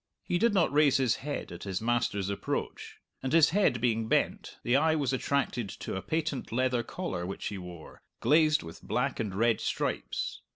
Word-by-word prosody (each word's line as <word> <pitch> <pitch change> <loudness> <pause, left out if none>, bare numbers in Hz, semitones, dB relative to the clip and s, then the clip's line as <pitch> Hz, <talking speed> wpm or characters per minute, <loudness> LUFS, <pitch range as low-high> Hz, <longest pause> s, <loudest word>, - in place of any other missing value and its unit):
He 175 - 0
did 235 +3 +4
not 170 -6 +3
raise 150 -2 +5
his 130 -4 +2
head 145 +1 -5
at 85 - -8
his 95 -2 -3
master's 115 -4 0
approach. 100 0 -4 0.2
And 130 - -3
his 160 -1 +6
head 190 -10 +2
being 115 -1 +1
bent, - - 0
the 120 - +2
eye 155 +3 +4
was 140 -4 0
attracted 130 -5 -1
to - - -6
a 95 - -3
patent 155 - -2
leather 125 0 +1
collar 145 - -4
which 95 +2 -4
he 100 - -6
wore, 90 -3 -10 0.2
glazed 155 0 +4
with 80 0 -10
black - - -1
and 105 -5 -2
red 115 +2 +2
stripes. - - -2
125 Hz, 190 wpm, -29 LUFS, 100-150 Hz, 0.2 s, his